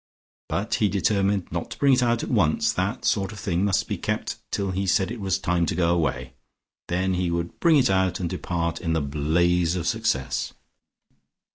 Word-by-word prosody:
But 105 +4 -2
he 105 - +4
determined 100 -1 0
not - - -3
to - - -8
bring 140 -1 +4
it 125 - +3
out 120 -1 +1
at - - -4
once; 90 -10 +2
that - - -2
sort 95 +1 +1
of 105 - -9
thing 95 -2 -1
must 100 -2 +1
be - - -3
kept - - -2
till 100 -2 -1
he 95 +1 -2
said 95 +1 +2
it 115 - -6
was 95 -3 0
time 85 -1 0
to - - -1
go 85 -1 +2
away. 65 -7 -1 0.5
Then 95 +2 0
he 90 -1 0
would 85 0 -3
bring 165 -3 +5
it 130 -8 +3
out, 95 -1 +1
and 90 - -1
depart 85 -2 -3
in 80 -3 -1
the 80 - +1
blaze 85 +4 +1
of 85 -2 -3
Success. 110 -12 -1
90 Hz, 205 wpm, -24 LUFS, 85-100 Hz, 0.5 s, bring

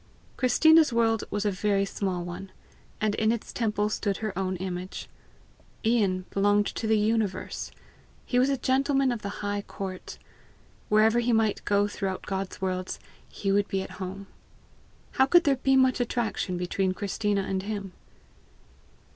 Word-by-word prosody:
Christina's 315 +5 +5
world 225 -1 +2
was 205 0 -2
a 205 - +2
very 200 +1 +1
small 190 -3 -2
one, 180 +2 -7 0.5
and 215 -1 +1
in 220 +1 +2
its 230 -2 -4
temple 210 -3 0
stood 205 -2 -1
her 215 -4 -4
own 190 0 -1
image. 185 0 -5 0.8
Ian 200 -5 +2
belonged 205 +1 +3
to 220 - -3
the 220 0 +4
universe. 210 -3 -1 0.6
He 245 - +1
was 260 +2 +3
a 275 - +1
gentleman 270 +1 +2
of 235 -3 -3
the 200 - -4 0.2
high 205 0 -1
court. 190 -2 -7 0.7
Wherever 220 +2 +4
he 240 +1 +1
might 220 -2 +1
go 205 0 +3
throughout 195 -2 -4
God's 195 -1 -4
worlds, 185 -1 -3 0.3
he 195 - -2
would 205 +1 +2
be 190 -1 -1
at - - -9
home. 190 +2 -5 0.9
How 265 -1 +3
could 350 +4 +6
there 280 -3 +2
be 270 +1 +2
much 260 -1 +4
attraction 225 -6 -1
between 185 +1 -1
Christina 205 0 -1
and 190 0 -2
him? 200 -2 -5
205 Hz, 155 wpm, -27 LUFS, 190-230 Hz, 0.9 s, could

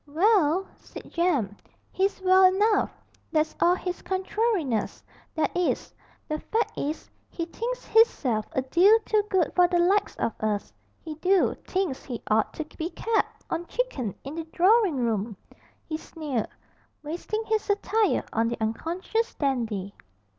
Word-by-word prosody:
'Well!' 360 +1 +3
said - - -12
Jem. 290 - +1 0.4
'He's 390 +1 0
well 375 0 +6
enough; 405 +3 +3 0.4
that's 310 -1 +1
all 350 +1 +5
his 360 -1 -5
contrariness, 375 - -1 0.3
that 315 - 0
is. 355 -1 -1 0.3
The 305 0 -2
fact 450 - -1
is, 300 +3 -3 0.2
he 335 - -4
thinks 470 +8 -5
hisself 270 - +3
a 260 - 0
deal 365 +11 +5
too 430 -1 +3
good 370 -5 +1
for 360 -1 +6
the 350 0 +1
likes 380 +4 +2
of 225 - -1
us, 210 -1 -2 0.3
he 320 - -6
do 370 +5 +2
thinks 370 -8 -1
he 240 -4 -5
ought 215 +1 +3
to 315 - -4
be 325 +2 -2
kep' 450 +3 -1
on 340 +1 -3
chickin 275 - -2
in 290 +4 -6
a - - -3
droring 375 +2 +3
room!' 225 -4 -1 0.5
he 315 - -2
sneered, 295 -9 -4 0.6
wasting 350 +8 -3
his 440 -1 +1
satire 420 +1 +1
on 225 +1 +2
the 235 - -2
unconscious 340 - -2
Dandy. 225 -8 -2
340 Hz, 145 wpm, -26 LUFS, 265-390 Hz, 0.6 s, well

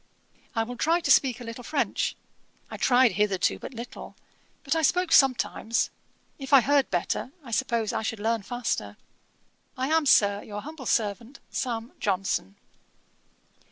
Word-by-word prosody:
I 225 - +2
will 245 +2 -7
try 330 +6 +2
to 300 -4 0
speak 260 -3 +4
a - - -8
little 230 +1 -8
French; 280 +3 -1 0.6
I - - -6
tried 250 -1 +4
hitherto 195 -1 +1
but 260 - -9
little, 235 +1 -9 0.5
but 275 - 0
I 325 - +1
spoke 360 +3 +2
sometimes. 255 -5 +2 0.5
If 270 +1 -5
I 275 - +9
heard 280 +1 +2
better, 180 +7 -2
I 240 - -10
suppose 230 -1 0
I - - -1
should 220 0 -3
learn 225 +1 0
faster. 200 - -3 0.8
I 260 +2 -1
am, 320 -2 +2
Sir, 205 -4 +4
'Your 205 -1 -7
humble 305 -3 -8
servant, 230 +4 -1
'SAM. 235 -1 -3
JOHNSON.' 185 - -1
240 Hz, 155 wpm, -26 LUFS, 215-270 Hz, 0.8 s, I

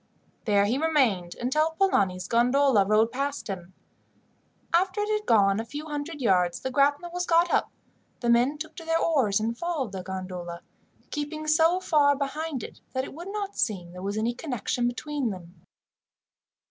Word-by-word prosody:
There 200 -2 +3
he 240 +6 0
remained 255 - +1
until 305 +6 +1
Polani's 185 - +1
gondola 240 -2 +3
rowed 215 +2 +3
past 280 +3 -3
him. 185 -2 -7 1.0
After 375 +4 +2
it 420 +1 -1
had 425 0 -1
gone 200 -2 +4
a - - -2
few 290 +7 -7
hundred 295 0 -5
yards, 180 -6 +2
the 260 - -3
grapnel 285 +5 +2
was 355 0 -2
got 340 +1 +4
up, - - +2 0.5
the 240 - -3
men 240 +5 +3
took 315 +1 -7
to 330 - -7
their 325 0 +1
oars 265 -13 +2
and 225 +2 -1
followed 300 - -2
the 190 -1 -5
gondola, 180 -2 -6 0.5
keeping 305 +1 -4
so 320 +4 +4
far 295 -5 +3
behind 280 -1 -4
that 260 0 0
it - - -8
would 340 +5 -8
not 405 -1 -4
seem 180 -6 -1
there 180 +1 -9
was 200 +2 -3
any 230 +2 0
connection 245 -2 -2
between 275 +1 -2
them. 180 -3 -8
260 Hz, 170 wpm, -26 LUFS, 205-315 Hz, 1.0 s, gone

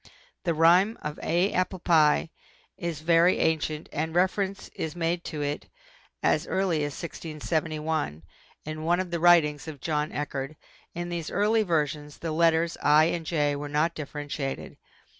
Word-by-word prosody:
The 170 -2 +1
rhyme 180 +7 +5
of 150 0 -5
A 175 +4 +1
APPLE 185 +1 0
PIE 160 -2 +3 0.4
is 170 -5 -4
very 170 +2 +4
ancient 155 -1 0
and 160 +2 -2
reference 190 +2 0
is 160 +1 -5
made 170 0 -1
to 150 -3 -4
it 145 +1 -4 0.5
as - - +2
early 190 -4 +1
as 145 -1 -2
1671 155 - -3 0.4
in 155 0 -5
one 175 +2 +2
of 185 -2 -3
the 170 - -1
writings 160 -4 +4
of 150 -3 -7
John 150 +1 -1
Eachard. 140 0 -4 0.4
In 175 0 -4
these 170 -2 -4
early 215 +2 +2
versions 150 -5 -1
the 165 - -4
letters 165 +1 +2
I 150 +1 +6
and 165 -2 -4
J 145 -3 +1
were 145 +1 -5
not 155 +3 +1
differentiated. 145 -2 -5
160 Hz, 155 wpm, -27 LUFS, 150-175 Hz, 0.5 s, I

